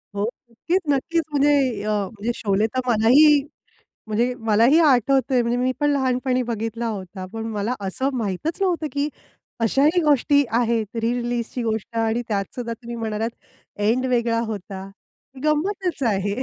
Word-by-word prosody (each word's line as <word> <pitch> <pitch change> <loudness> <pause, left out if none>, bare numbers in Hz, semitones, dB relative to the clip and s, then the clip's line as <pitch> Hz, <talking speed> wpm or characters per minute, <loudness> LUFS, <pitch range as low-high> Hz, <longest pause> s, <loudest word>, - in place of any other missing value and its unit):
हो, 200 - -1 0.3
नक्कीच, 345 +11 0
नक्कीच. 325 +4 +1
म्हणजे 275 -7 +2
अ, 215 - -2 0.2
म्हणजे 225 +2 -3
शोले 205 +1 +1
तर 255 - +2
मलाही 270 +6 +6 0.7
म्हणजे 235 +4 0
मलाही 230 +9 +5
आठवतंय 270 -3 +3
म्हणजे 235 +1 0
मी 255 +1 +1
पण 290 0 +3
लहानपणी 255 -2 +1
बघितला 225 +1 -3
होता. 190 -2 -6
पण 225 0 -5
मला 210 +4 -1
असं 260 +8 -1
माहीतच 225 - -3
नव्हतं, 345 -4 +1
की 285 +1 0 0.5
अशाही 285 - +3
गोष्टी 285 -1 +3 0.2
आहेत, 230 -2 +1
रि-रिलीजची 240 +1 -2
गोष्ट 225 +1 -3
आणि 225 +1 +1
त्यातसुद्धा 225 +3 -3
तुम्ही 235 +1 -7
म्हणालात 225 0 -2 0.5
एंड 240 +5 +2
वेगळा 235 -2 +1
होता. 195 -2 -6 0.5
रि-रिलीजची. 295 - 0
240 Hz, 135 wpm, -22 LUFS, 220-275 Hz, 0.7 s, मलाही